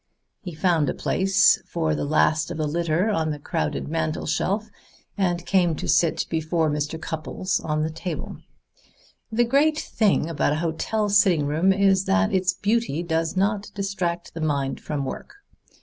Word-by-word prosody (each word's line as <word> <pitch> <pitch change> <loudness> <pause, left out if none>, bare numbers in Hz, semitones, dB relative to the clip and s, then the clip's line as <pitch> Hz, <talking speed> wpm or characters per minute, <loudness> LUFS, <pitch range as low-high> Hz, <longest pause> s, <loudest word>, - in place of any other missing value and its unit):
He 180 -7 -7
found 160 -4 +2
a - - -2
place 190 +1 +3
for 160 -2 -1
the 150 - -2
last 155 +1 +2
of - - -5
the 155 - -1
litter 170 +6 0
on 160 -5 0
the 150 - -3
crowded 75 - -3
mantel 155 0 -2
shelf, 200 +7 -1 0.4
and 175 -3 -1
came 175 -4 +2
to - - -5
sit 165 -2 +2
before 160 -1 0
Mr. 150 +2 -2
Cupples 165 +4 -3
on 155 -1 -1
the 160 - -2
table. 165 0 -5 0.9
"The 230 +2 +3
great 290 +5 +3
thing 210 - +1
about 160 -2 0
a 155 +3 -2
hotel 210 +6 -1
sitting 195 -7 +4
room 160 +6 +2
is 195 0 +3
that 95 0 +2
its 185 -1 +2
beauty 205 -4 -1
does 165 0 -1
not 205 +1 0
distract 185 -4 -3
the 165 - -6
mind 140 -3 -1
from 145 -3 -3
work. 135 - -7
170 Hz, 165 wpm, -24 LUFS, 155-195 Hz, 0.9 s, sitting